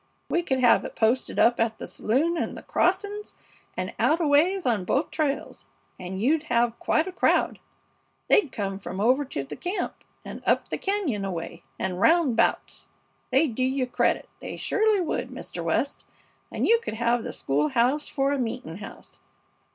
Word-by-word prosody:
We 345 - +2
could 270 -6 -1
have 245 -2 +5
it - - -7
posted 235 +3 +1
up 240 +1 +4
at 225 -1 +1
the - - -6
saloon 290 +10 0
and 325 - -3
the - - -10
crossings, 405 +3 -1 0.4
and - - -3
out 320 - +3
a 335 - +1
ways 330 +6 +3
on 225 -6 +1
both 275 - 0
trails, 295 -3 -2 0.3
and 185 +1 -5
you'd 295 +8 +2
have 235 -1 +1
quite 315 - +1
a - - -4
crowd. - - +1 0.7
They'd 315 -11 +4
come 195 -3 -3
from 190 -1 -6
over 255 +7 +3
to 140 - -4
the 135 - -8
camp, 365 +3 -4 0.2
and - - -7
up - - +1
the - - -3
cañon 285 - -1
way, 170 0 -6 0.2
and 185 -1 -3
roundabouts. 320 -6 +2 0.4
They'd 270 0 +2
do 255 - -1
you 260 0 +1
credit, 250 - 0
they - - -7
surely 430 -2 +2
would, 330 - -2
Mr. - - -7
West. - - -1 0.5
And - - -1
you 465 0 +5
could 220 - -5
have 235 +1 +1
the - - -5
school 145 +2 0
house 250 - +1
for 275 0 0
a 285 - 0
meeting 225 -8 -4
house. 205 - -11
260 Hz, 180 wpm, -26 LUFS, 220-325 Hz, 0.7 s, have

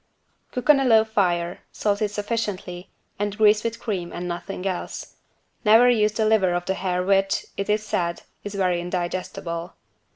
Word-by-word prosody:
Cook 250 - -4
on 285 - +4
a - - +1
low 225 -4 +6
fire, 175 -5 0
salt 205 0 -1
it 210 - +1
sufficiently 205 -4 -4 0.3
and 205 0 -2
grease 210 -1 +5
with 230 0 -3
cream 185 -6 -3
and 175 +1 -5
nothing 180 +2 -5
else. 185 -2 -4 0.5
Never 225 +3 +7
use 215 -3 +2
the 220 0 0
liver 200 -5 +3
of 175 0 -2
the 190 - 0
hare 180 -1 -1
which, 195 +1 +2
it 200 - -3
is 210 +1 +1
said, 170 -4 -2 0.2
is 205 0 -6
very 180 -3 +1
indigestible. 175 -1 -4
195 Hz, 170 wpm, -24 LUFS, 180-215 Hz, 0.5 s, Never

